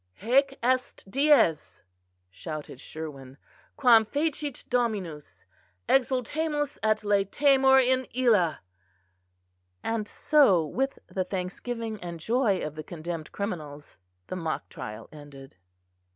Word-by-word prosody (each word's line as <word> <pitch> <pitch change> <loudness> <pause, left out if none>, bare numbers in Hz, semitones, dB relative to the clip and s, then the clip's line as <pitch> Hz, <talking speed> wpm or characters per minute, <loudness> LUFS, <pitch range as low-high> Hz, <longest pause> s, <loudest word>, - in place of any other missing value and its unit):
_" - - -21
"Haec 270 +2 +3
est 255 -4 0
dies," 275 - +3 0.5
shouted 150 - -7
Sherwin, 140 -4 -8 0.4
"quam 240 -5 +6
fecit 290 +3 -3
Dominus; 205 -11 -2 0.4
exultemus 285 +4 0
et 215 0 +1
laetemur 265 +7 +4
in 260 0 +2
illâ": 220 -11 +2 1.3
and 225 -2 -2
so 210 - +4
with 270 - -2
the 190 - -2
thanksgiving 215 +5 -5
and 170 -1 -6
joy 220 +1 +1
of 155 - -5
the 155 0 -7
condemned 165 0 -6
criminals, 155 -8 -6 0.3
the - - -6
mock 165 -3 -3
trial 105 +1 -8
ended. 140 -5 -13
215 Hz, 110 wpm, -27 LUFS, 160-260 Hz, 1.3 s, quam